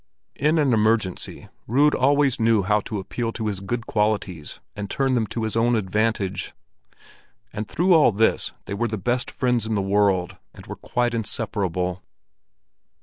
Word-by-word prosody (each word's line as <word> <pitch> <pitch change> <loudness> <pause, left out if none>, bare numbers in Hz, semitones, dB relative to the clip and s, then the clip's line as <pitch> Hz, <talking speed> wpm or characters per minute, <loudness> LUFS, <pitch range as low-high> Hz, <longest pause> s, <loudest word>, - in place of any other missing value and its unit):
In 150 +4 +2
an 145 -5 +3
emergency, 110 -4 0 0.2
Rud 145 +6 +4
always 140 -1 +2
knew 110 -2 +3
how 105 +3 +2
to 110 - -4
appeal 115 +4 -3
to 110 - -4
his 100 -3 -2
good 110 +4 -4
qualities 105 -7 -1 0.2
and 105 -1 -5
turn 135 +3 0
them 115 -3 +1
to 115 - -4
his 110 0 -2
own 120 +1 +3
advantage. 105 -1 -1 1.0
And 105 0 -4
through 180 - +2
all 155 -7 +6
this 110 +2 +1
they 100 - -5
were 120 +4 0
the 110 -1 -3
best 120 +6 -1
friends 125 -3 0
in 110 - -1
the - - +1
world, 95 -2 +1 0.2
and - - -12
were - - -6
quite 120 -1 -1
inseparable. 95 -5 -2
110 Hz, 165 wpm, -23 LUFS, 100-120 Hz, 1.0 s, all